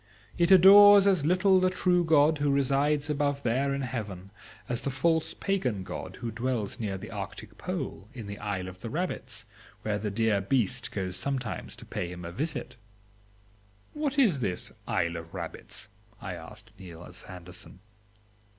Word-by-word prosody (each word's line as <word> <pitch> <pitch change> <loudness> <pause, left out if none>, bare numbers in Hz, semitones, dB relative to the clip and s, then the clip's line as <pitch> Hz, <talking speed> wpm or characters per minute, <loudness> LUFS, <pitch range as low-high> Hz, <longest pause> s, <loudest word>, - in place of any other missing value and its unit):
It 170 0 +2
adores 200 +2 +9
as 185 -7 +3
little 185 +2 +4
the 185 0 +3
true 180 -1 +2
God 155 -1 +4
who 145 0 +1
resides 140 +2 +2
above 145 -1 0
there 130 +4 +1
in 140 0 -1
heaven, 105 -6 -5 0.4
as 120 -1 -2
the - - -2
false 160 +4 +1
pagan 130 - -1
god - - -7
who 115 - -5
dwells 115 -2 -2
near 100 -4 -2
the 95 - -9
arctic - - -7
pole, 95 - -4
in 120 -5 -8
the 100 0 -7
Isle 100 -3 -3
of 95 0 -10
the 115 - -5
Rabbits, 120 -9 -4 0.4
where 105 -1 -1
the 105 0 -2
dear 105 -1 +1
beast 120 +2 0
goes 95 -2 -3
sometimes 130 +2 -3
to - - -12
pay 90 - -4
him 90 0 -8
a 85 - -5
visit. 140 - -3 1.2
"What 295 -3 -2
is 210 - +4
this 95 -7 -3 0.2
Isle 85 0 0
of 85 0 -9
Rabbits?" - - -6 0.3
I 95 - -5
asked 105 +6 -10
Niels 90 -1 -10
Andersen. 90 -1 -9
125 Hz, 165 wpm, -28 LUFS, 100-155 Hz, 1.2 s, adores